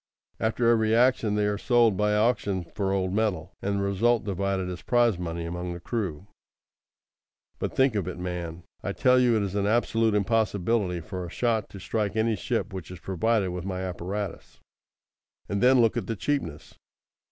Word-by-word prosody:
After 115 +1 +1
every 110 -1 +3
action 120 -3 +3
they 105 0 +1
are 105 0 -1
sold 120 -4 +3
by 105 +2 +1
auction 105 -4 +1
for 100 -2 -1
old 95 -1 0
metal, 100 -5 -1
and 100 +1 -1
the 100 - 0
result 110 +4 +2
divided 100 -1 -1
as 90 -1 -6
prize 120 -6 +2
money 85 -1 -4
among 90 +1 -4
the 85 - -7
crew. 95 -4 -3 1.3
But - - -3
think 130 -2 +4
of 100 -5 -1
it, 90 - -5
man! 90 -2 -5 0.2
I - - -3
tell 125 0 +4
you 120 -3 +4
it 105 - +1
is 100 -1 -3
an 100 0 0
absolute 115 -1 +2
impossibility 105 -3 +1
for 90 +2 -6
a 85 - -6
shot 115 +1 0
to 100 - -10
strike 105 +1 -2
any 110 0 +2
ship 105 0 -2
which 95 -3 -6
is 90 -1 -9
provided 95 +2 0
with 90 -1 -5
my 95 -1 -3
apparatus. 95 +1 -5 0.9
And 100 - -2
then 130 +1 +6
look 115 -2 +3
at - - -2
the 115 - -2
cheapness. 95 - -3
100 Hz, 185 wpm, -27 LUFS, 90-115 Hz, 1.3 s, then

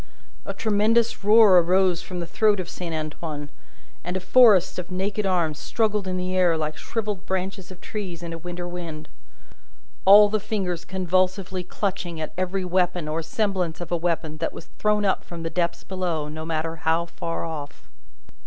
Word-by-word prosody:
A - - -3
tremendous 225 +2 +2
roar 210 -3 +7
arose 180 0 +2
from 180 -2 -6
the - - -3
throat 210 +4 +2
of 180 - -4
Saint 170 -2 -5
Antoine, 155 -1 -5 0.5
and 180 +2 -3
a - - -2
forest 205 -3 +5
of 180 - -6
naked 195 +2 -1
arms 165 -5 0
struggled 210 -3 0
in 185 0 -2
the 185 0 -2
air 175 -3 +3
like 155 -1 -2
shrivelled 210 -2 -4
branches 190 0 -3
of 185 -1 -11
trees 185 -6 -6
in 170 -1 -5
a - - -5
winter 175 +1 -6
wind: 165 -3 -7 0.9
all 205 +2 +9
the 215 +1 0
fingers 190 -5 -3
convulsively 185 0 0
clutching 180 -3 -3
at 155 - -5
every 185 +1 -1
weapon 180 -2 0
or 155 +2 -2
semblance 180 -1 -1
of 175 -1 -7
a - - +2
weapon 165 -2 -1
that 165 - -2
was 165 - -11
thrown 210 -1 +2
up 190 - +1
from 170 -1 -8
the 165 - -3
depths 170 -1 -1
below, 175 -5 -2
no 155 +1 -6
matter 165 0 -2
how 160 +2 +1
far 165 0 -4
off. 145 -9 -7
180 Hz, 180 wpm, -24 LUFS, 165-195 Hz, 0.9 s, all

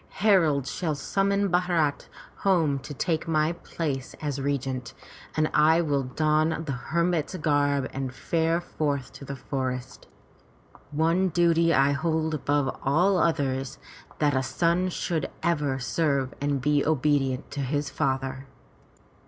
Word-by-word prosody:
Heralds 160 -10 +3
shall 160 -5 -2
summon 200 +7 0
Bharat 175 -5 +1 0.3
home 165 -8 +2
to 135 +3 -10
take 160 +3 -1
my 155 0 +2
place 150 -6 -4
as 145 -3 -3
regent, 135 -3 -2 0.4
and 155 0 +3
I 160 +3 +5
will 145 -4 +1
don 155 +4 +1
the 145 - -3
hermit's 170 +6 -1
garb 145 -4 +1
and 135 -1 -3
fare 165 +5 0
forth 145 -6 -3
to 140 - -10
the 140 - -5
forest. 130 -1 -4 0.8
One 165 +5 +2
duty 170 0 +3
I 135 -2 +4
hold 160 +2 0
above 145 -2 0
all 175 +7 +3
others 135 -5 0 0.2
— - - -23
that 145 -2 +2
a 130 - +2
son 170 +8 +1
should 165 -3 -2
ever 150 -6 +1
serve 135 -1 0
and 145 -1 0
be 145 +1 +2
obedient 145 -3 +1
to 145 - -5
his 140 +1 -1
father." 135 -1 -2
150 Hz, 135 wpm, -26 LUFS, 135-165 Hz, 0.8 s, I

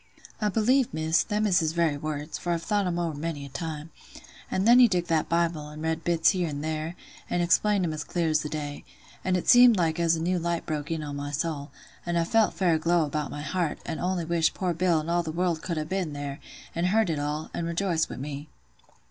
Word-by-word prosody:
I 210 - +2
believe, 240 +5 +2
Miss, 160 +1 +2
them 210 0 -1
is 190 -3 +4
his 160 -2 0
very 165 -3 +2
words, 150 +1 -4
for 175 - -1
I've 165 -1 -3
thought 205 -3 +1
'em 175 -1 -1
ower 170 -2 -1
many 145 -1 -4
a - - -9
time. 155 +3 -5 0.6
An' 190 - 0
then 240 +2 +7
he 250 - +8
took 180 -5 0
that 160 -2 +1
Bible, 170 -3 0
an' 150 +1 -9
read 160 0 -2
bits 165 -2 +3
here 180 -4 -1
and 145 0 -5
there, 160 +2 -3 0.3
an' 175 - 0
explained 195 +2 +3
'em 160 - -2
as 155 - -4
clear 170 -2 -1
as 155 -1 +2
the 150 -1 -4
day: 145 -2 -5 0.4
and 185 -1 +1
it 180 - -5
seemed 245 -2 +8
like 165 -2 +1
as 170 -1 +3
a - - -3
new 175 +2 0
light 170 0 -2
broke 150 0 -3
in 160 -2 -2
on 145 -1 -5
my 145 0 -4
soul; 150 0 -3 0.3
an' 175 0 -1
I 170 - +3
felt 220 +5 +2
fair 180 -3 +2
aglow 165 +1 +2
about 150 0 -3
my 145 - -6
heart, 165 +1 -1
an' 160 - -4
only 180 -2 -1
wished 165 -1 +1
poor 180 -2 -1
Bill 170 -1 +2
an' 155 - -8
all 175 +1 +2
the 160 -2 -4
world 170 -1 0
could 170 -2 -3
ha' 155 0 -2
been 185 -5 -2
there, 145 -1 -5 0.3
an' 170 +1 -1
heard 200 0 +2
it 155 - -2
all, 150 +2 -3
and 170 - -2
rejoiced 170 -1 0
wi' - - -6
me. 145 +2 -6
165 Hz, 245 wpm, -27 LUFS, 155-180 Hz, 0.6 s, he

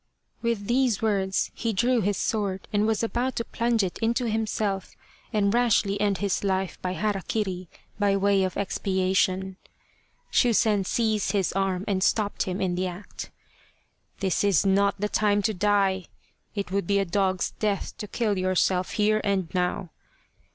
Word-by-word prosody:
With 230 -4 -1
these 240 -1 +1
words 195 -3 +1
he 230 -1 -2
drew 240 +4 +2
his 205 0 0
sword 200 -3 -2
and 210 +1 +2
was 225 0 +1
about 245 +3 -1
to 230 - -2
plunge 230 -2 0
it 185 - -3
into 235 +2 0
himself 215 -3 -2 0.4
and 200 -1 +2
rashly 210 -4 +2
end 200 -2 +2
his 200 0 -1
life 190 -1 -1
by 180 0 -2
hara 205 0 -1
kiri, 185 -5 -2 0.3
by 200 -1 +3
way 195 0 +3
of 185 -1 -2
expiation. 190 -1 0 0.7
Shusen 220 -5 +3
seized 220 -4 +1
his 195 -3 +1
arm 195 0 -1
and 195 -3 0
stopped 205 0 +1
him 185 +1 -2
in 185 -2 0
the 185 +1 -1
act. 180 +3 -8 0.5
" - - -40
This 190 -1 +1
is 200 -3 +3
not 200 +1 +2
the 210 - 0
time 205 -1 +2
to 220 - +1
die! 195 -1 +1 0.5
It 200 -3 -3
would 195 -3 -1
be 200 - +2
a 195 - +2
dog's 190 0 0
death 205 -2 -1
to 210 - -5
kill 210 -2 -1
yourself 185 0 +1
here 215 0 +2
and 195 -5 -1
now. 180 0 -1
200 Hz, 165 wpm, -26 LUFS, 190-215 Hz, 0.7 s, by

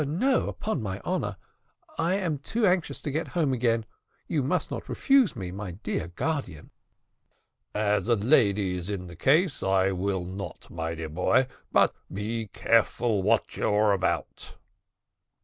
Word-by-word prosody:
"No, 245 - +1
upon 215 - -3
my 95 -3 -4
honour; - - -2 0.6
I 170 +3 +1
am 170 -7 -1
too 220 - 0
anxious 180 -3 +1
to 145 - -2
get 155 +4 -2
home 150 -6 +2
again. 115 -2 +1 0.4
You 155 - 0
must 135 - 0
not - - -5
refuse 270 -6 +3
me, 95 -5 -5
my 95 -1 -6
dear 85 -3 -3
guardian." 130 - -4 1.0
"As 105 0 +1
a 120 - +4
lady 105 -5 +3
is 90 +2 -5
in 95 -3 -3
the 85 -1 -10
case, 150 - +2
I 95 0 +2
will 95 -1 -1
not, 95 +2 -7
my 80 0 -3
dear 80 -1 -5
boy; 90 +11 +2 0.3
but - - +4 0.2
be 110 +3 -3
careful 115 -1 +2
what - - +1
you - - +1
are 105 0 +4
about." 95 - -2
110 Hz, 155 wpm, -27 LUFS, 95-150 Hz, 1.0 s, a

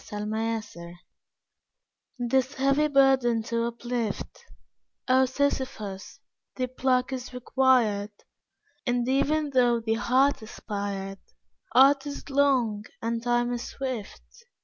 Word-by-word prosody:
Ill 210 0 -4
Luck 220 0 -2 1.5
This 260 +2 0
heavy 275 +3 +2
burden 265 -5 +3
to 230 +1 -1
uplift, 235 -2 -4 0.6
O 260 0 +5
Sysiphus, 255 -8 -3 0.4
thy 255 - -1
pluck 255 +1 0
is 255 0 -6
required! 250 -5 +2 0.8
And 245 0 0
even 290 +3 +1
though 245 -3 +3
the 225 -1 -1
heart 255 +4 +2
aspired, 200 -3 -5 0.6
Art 275 +2 +6
is 285 0 -7
long 255 -7 +2
and 230 0 -2
Time 240 0 +1
is 240 0 -4
swift. 255 -6 -6
245 Hz, 105 wpm, -26 LUFS, 225-265 Hz, 1.5 s, Art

